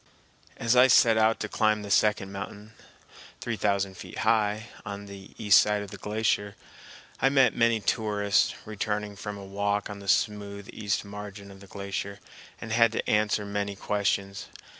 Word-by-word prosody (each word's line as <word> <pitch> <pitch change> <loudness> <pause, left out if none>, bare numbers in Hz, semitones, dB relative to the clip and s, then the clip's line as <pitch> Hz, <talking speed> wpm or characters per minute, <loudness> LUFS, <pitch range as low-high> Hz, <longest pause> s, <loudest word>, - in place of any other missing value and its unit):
As 115 +1 +1
I 125 +1 +7
set 115 -2 +6
out 110 0 +3
to - - -2
climb 110 -1 +1
the 100 - -6
second 105 -1 +2
mountain, 105 +2 -8 0.7
three 120 - -3
thousand 100 -2 0
feet - - -10
high, 110 0 +1
on 100 0 -7
the 100 -1 -12
east 105 -2 +6
side 105 -1 0
of 100 - -10
the 100 - -8
glacier, 105 -1 -1 0.7
I 135 - +5
met 135 -4 +4
many 115 -1 +3
tourists 105 -2 +1
returning 105 -1 -3
from 105 +1 -6
a 100 - -9
walk 100 +1 -2
on 100 - -8
the 100 - -11
smooth 100 0 0
east 105 -1 -2
margin 100 0 -9
of 95 - -13
the 100 - -14
glacier, 100 0 -5 0.4
and 115 - -7
had 115 0 +4
to - - -3
answer 105 0 +1
many 100 0 -3
questions. 100 0 -2
105 Hz, 170 wpm, -27 LUFS, 100-110 Hz, 0.7 s, I